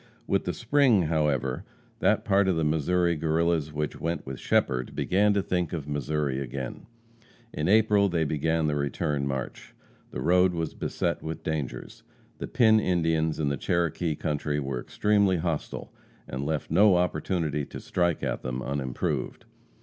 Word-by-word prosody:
With - - 0
the - - -1
spring, 130 -10 +3
however, 75 -5 0 0.4
that - - +2
part 100 0 +3
of 95 - +2
the 80 - 0
Missouri 85 +3 +1
Guerrillas 80 0 0
which 75 0 -3
went 85 -2 -3
with 65 -1 -6
Shepherd, 65 -1 0
began 105 +3 +2
to 100 - +1
think 90 -2 -1
of 75 -4 -4
Missouri 75 -1 -1
again. 65 -1 -6 0.7
In 75 - -2
April 105 -1 +4
they 85 -2 +1
began 80 +2 0
the 75 - +1
return 70 0 -1
march. 65 -1 -5 0.3
The - - -6
road 90 +1 +3
was 80 -1 -2
beset - - -2
with 80 0 -6
dangers. 75 -5 -4 0.4
The - - -4
Pin 110 -2 +4
Indians 80 -5 +1
in 75 -2 +1
the 70 - -1
Cherokee 85 0 0
country 75 -1 -2
were 65 -3 -3
extremely 100 +1 +2
hostile, 80 -2 -4 0.3
and 65 +2 -4
left 80 -1 -2
no 100 -2 +6
opportunity 80 -3 0
to - - -8
strike 85 -3 0
at - - -2
them 65 0 -4
unimproved. 70 -2 -3
80 Hz, 155 wpm, -27 LUFS, 75-90 Hz, 0.7 s, no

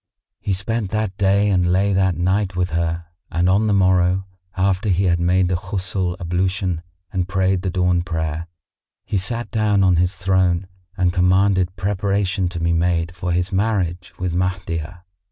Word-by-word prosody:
He 100 - -1
spent 100 +2 -2
that 110 -2 -2
day 100 +1 +3
and 90 -2 +2
lay 100 +2 +2
that 95 -2 +2
night 95 +2 0
with 90 0 0
her 85 0 -1 0.2
and 85 +1 +1
on 100 +4 +3
the - - +2
morrow, 95 -1 +3 0.3
after 95 +2 +1
he 95 +1 +2
had 85 -2 +2
made 90 +1 +2
the 90 - -1
Ghusl 95 -1 -2
ablution 90 0 -1 0.3
and 90 -2 -1
prayed 95 0 +1
the 95 - -2
dawn 90 -1 +1
prayer, 80 -1 -3 0.6
he 100 - -1
sat 115 +5 -3
down 105 -3 +2
on 90 -2 +4
his 90 +2 +1
throne 95 -1 +1 0.3
and 90 -2 +2
commanded 95 0 +2
preparation 100 -1 0
to 90 -1 -5
be 85 0 +1
made 85 0 0
for 90 0 -3
his 90 +2 0
marriage 95 -4 -1
with 90 -2 -2
Mahdiyah. 90 -2 -3
90 Hz, 170 wpm, -21 LUFS, 90-95 Hz, 0.6 s, on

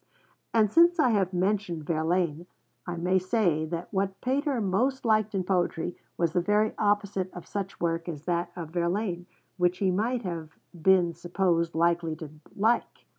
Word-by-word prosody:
And 215 -3 +3
since 340 +4 +5
I 305 -6 +4
have 195 -4 +1
mentioned 185 -3 -1
Verlaine, 165 +1 0 0.4
I 175 - -3
may 180 +2 +2
say 185 -5 +1
that 170 +4 -5
what 195 0 -1
Pater 270 0 0
most 235 +7 0
liked 215 -2 +2
in 190 - 0
poetry 175 -2 -1 0.2
was 170 -2 +1
the 180 - +2
very 210 +3 +2
opposite 205 -3 0
of 175 - -9
such 195 -1 -5
work 165 0 -1
as 150 -3 -7
that 175 -1 -1
of 165 -3 -6
Verlaine, 175 +1 -1 0.3
which 180 0 +2
he 190 -1 +1
might 230 +6 0
have 165 -4 -6 0.2
been 175 0 +3
supposed 170 -1 0
likely 170 -1 +1
to 155 -2 -9 0.2
like. 225 +4 0
180 Hz, 165 wpm, -28 LUFS, 170-205 Hz, 0.4 s, since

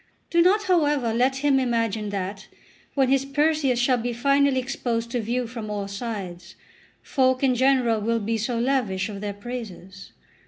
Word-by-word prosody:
Do 340 - +4
not, 395 +5 +4
however, 295 - +2
let 255 +3 +2
him 275 -2 +4
imagine 230 -4 -1
that, 195 +1 -5 0.5
when 270 -2 +3
his 270 0 +3
Perseus 290 -2 +1
shall 245 +1 +2
be 240 +1 -2
finally 275 +2 +2
exposed 235 -3 -3
to 245 - -1
view 240 +3 -1
from 230 -2 -7
all 205 -1 -3
sides, 195 -5 -6 0.5
folk 260 0 +1
in 260 -2 +4
general 250 -3 +2
will 230 +2 0
be 225 +1 -2
so 230 +3 -2
lavish 230 -6 0
of 200 -2 -7
their 205 -1 -4
praises. 205 -4 -8
240 Hz, 165 wpm, -24 LUFS, 210-270 Hz, 0.5 s, Do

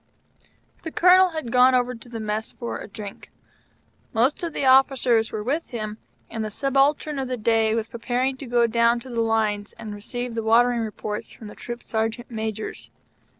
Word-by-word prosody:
The 325 - -5
Colonel 370 +2 +6
had 315 -8 -5
gone 255 +1 +6
over 250 0 +1
to 240 0 -13
the 230 -1 -6
Mess 215 0 -3
for 235 - -5
a - - -8
drink. 200 -1 -9 0.8
Most 245 +6 +2
of 340 -1 -3
the 280 - -2
officers 260 -4 +4
were 215 -1 -4
with 290 +8 -1
him, 215 -3 -5 0.3
and 225 -1 -4
the 215 - -3
Subaltern 275 +4 +1
of 265 - -2
the 255 0 -3
Day 225 0 +2
was 225 -1 -1
preparing 245 +3 -1
to 270 - -8
go 240 0 +3
down 235 +1 +3
to 255 - -10
the 230 -1 0
lines, 215 -2 0
and 215 -2 -8
receive 245 +4 -5
the 225 - -2
watering 235 +2 +3
reports 210 -1 -5
from 215 - -11
the - - -12
Troop 240 0 -7
Sergeant 225 +2 -2
Majors. 220 -1 -5
235 Hz, 190 wpm, -24 LUFS, 220-255 Hz, 0.8 s, Colonel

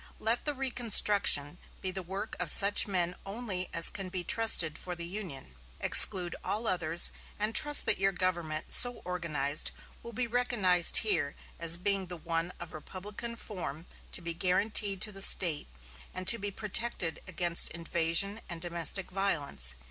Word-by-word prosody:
Let 225 +2 -2
the 295 -1 -2
reconstruction 210 - +3 0.2
be 185 - -3
the 190 +1 -5
work 190 +4 -7
of 180 -3 -2
such 200 +5 +7
men 180 -3 -3
only 195 -3 -5
as 165 - 0
can 195 -2 -6
be 180 -1 -6
trusted 175 -7 +3
for 180 +2 -8
the 170 0 -9
Union. 170 - -8 0.3
Exclude 175 -2 +4
all 220 +3 -4
others; 170 -3 0 0.3
and 210 +2 -3
trust 295 +5 +5
that - - +1
your 195 0 +1
government 175 -4 -4
so 245 0 +4
organized 155 -5 -2 0.3
will 235 - -11
be 240 +2 -3
recognized 215 -8 +2
here 160 -9 -1 0.2
as 170 0 +4
being 195 +1 -1
the 175 0 -7
one 165 +1 -5
of 175 -2 -10
republican 205 +9 -8
form 180 -8 -8 0.3
to - - -1
be 170 0 -4
guaranteed 195 +2 0
to 210 - +2
the 195 -1 -5
State, 170 -6 +4 0.5
and 185 - -6
to 235 - +6
be 205 +1 -4
protected 200 -4 -3
against 175 -1 0
invasion 170 +5 -2
and 170 -2 -7
domestic 175 +2 -2
violence. 145 - -2
185 Hz, 160 wpm, -29 LUFS, 170-210 Hz, 0.5 s, such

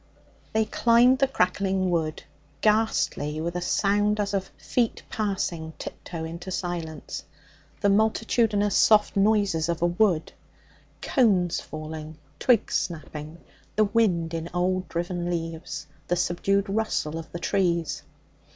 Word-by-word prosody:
They 220 0 +2
climbed 240 +4 +4
the 275 - +4
crackling 190 -4 +1
wood, 160 -3 -1 0.4
ghastly 210 -8 +1
with 170 +2 -3
a 180 - -1
sound 205 +3 +2
as 205 -1 -1
of 190 -1 -1
feet 240 -3 -1
passing 185 -7 -2
tiptoe 165 -2 -7
into 170 +3 -6
silence 175 -4 -4 0.6
the 200 - +3
multitudinous 215 0 +2
soft 215 -1 +5
noises 200 -5 +2
of 170 0 -1
a - - +5
wood, 175 -2 +1 0.7
cones 195 - +2
falling, 155 0 -7 0.2
twigs 245 -5 +3
snapping, 155 -1 -4 0.3
the 215 - +4
wind 190 -6 +1
in 165 0 -3
old 185 0 0
driven 175 0 -2
leaves, 165 -3 -4 0.2
the 175 - +1
subdued 195 +3 +1
rustle 195 -6 -1
of 165 - -10
the - - -4
trees. 170 -2 0
180 Hz, 125 wpm, -26 LUFS, 165-210 Hz, 0.7 s, soft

